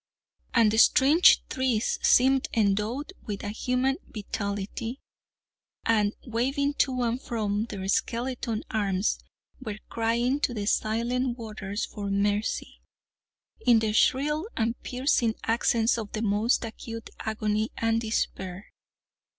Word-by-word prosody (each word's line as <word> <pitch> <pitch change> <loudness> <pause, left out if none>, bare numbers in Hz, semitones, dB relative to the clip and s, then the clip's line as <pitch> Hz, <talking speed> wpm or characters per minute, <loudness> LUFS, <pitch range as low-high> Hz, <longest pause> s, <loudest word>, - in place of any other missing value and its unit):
And 225 -3 +5
the 220 - +2
strange 290 +9 +6
trees 255 -4 0
seemed 265 +1 +4
endowed 220 - 0
with 205 0 -4
a 205 - -3
human 250 +5 0
vitality, 205 +4 -4 0.9
and 210 -2 +2
waving 270 +4 0
to 255 -2 +2
and 240 +2 -1
fro 215 -2 -1
their 190 -1 -5
skeleton 235 +1 -1
arms, 200 -2 0 0.4
were 215 -5 -5
crying 235 +4 0
to 245 -4 0
the 205 -2 -3
silent 235 +4 0
waters 210 -3 -4
for 205 -2 -6
mercy, 205 +2 -1 0.8
in 235 - +6
the 220 -1 0
shrill 300 - +2
and 230 0 +1
piercing 250 -3 +1
accents 230 0 +2
of 210 -2 -6
the 220 - -2
most 215 +4 +2
acute 230 0 -8
agony 215 0 -1
and 225 0 +1
despair. 190 -4 -3
225 Hz, 120 wpm, -27 LUFS, 210-250 Hz, 0.9 s, strange